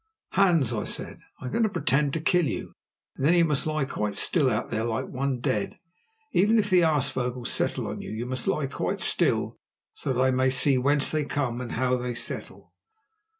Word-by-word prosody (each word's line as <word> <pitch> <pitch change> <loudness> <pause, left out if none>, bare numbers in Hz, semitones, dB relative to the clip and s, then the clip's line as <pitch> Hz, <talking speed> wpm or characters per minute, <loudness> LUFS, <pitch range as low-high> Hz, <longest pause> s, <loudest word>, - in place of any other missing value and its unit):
"Hans," 170 - +3
I 105 -2 -2
said, - - -4 0.2
"I - - -7
am 125 - -4
going 235 - 0
to 220 - +3
pretend 140 -4 +1
to 165 - -1
kill 170 0 +2
you, - - -5 0.4
and - - -6
then 165 +5 +4
you 170 -1 +5
must 150 -1 0
lie 155 -2 0
quite 105 -6 -3
still 145 - +2
out 110 -2 -2
there 110 -1 -1
like 115 -1 -2
one 130 -1 -2
dead. 135 +9 -2 0.6
Even 210 +5 +4
if 205 -2 +1
the 180 -1 +6
aasvogels 130 -6 0
settle - - 0
on - - -5
you, - - -8
you 110 +2 -4
must 130 0 -3
lie 150 - +1
quite 135 - -3
still, - - +1 0.3
so - - -3
that 125 - -1
I 130 0 +3
may 130 0 +2
see 130 +1 +4
whence 140 +2 +2
they 155 -1 0
come 135 -4 -2
and 120 - -6
how 125 +1 +1
they 125 -1 -4
settle." 120 - -6
135 Hz, 210 wpm, -26 LUFS, 125-155 Hz, 0.6 s, the